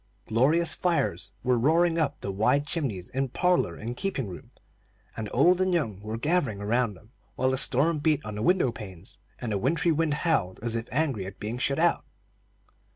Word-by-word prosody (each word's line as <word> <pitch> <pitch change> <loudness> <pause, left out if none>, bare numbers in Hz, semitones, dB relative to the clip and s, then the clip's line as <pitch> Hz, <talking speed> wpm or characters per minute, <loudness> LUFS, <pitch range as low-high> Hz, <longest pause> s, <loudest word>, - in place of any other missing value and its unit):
Glorious 150 +9 +3
fires 175 -2 0
were 125 -2 +2
roaring 165 +5 +3
up 145 -3 -1
the 100 - -3
wide 110 +9 +2
chimneys 125 - -3
in 135 0 -1
parlor 180 - +1
and 115 +6 -5
keeping 165 - -2
room, 90 - -9 0.7
and 110 -2 -4
old 175 +8 +4
and 185 -1 +2
young 110 - -1
were 110 +2 -5
gathering 140 - 0
around 110 +1 0
them, 105 +5 -19 0.2
while 130 0 +1
the 130 - 0
storm 150 +5 +2
beat 150 -1 +2
on 105 - -5
the 105 - -4
window 175 -1 +3
panes, 95 -4 -8 0.2
and 120 -3 -4
the 100 - 0
wintry 165 - +2
wind 155 -1 +1
howled 150 - 0
as 115 -1 -1
if 115 +1 -4
angry 130 -9 0
at 100 - -10
being 110 +4 -4
shut 140 +2 0
out. 170 +1 +2
130 Hz, 190 wpm, -27 LUFS, 110-160 Hz, 0.7 s, old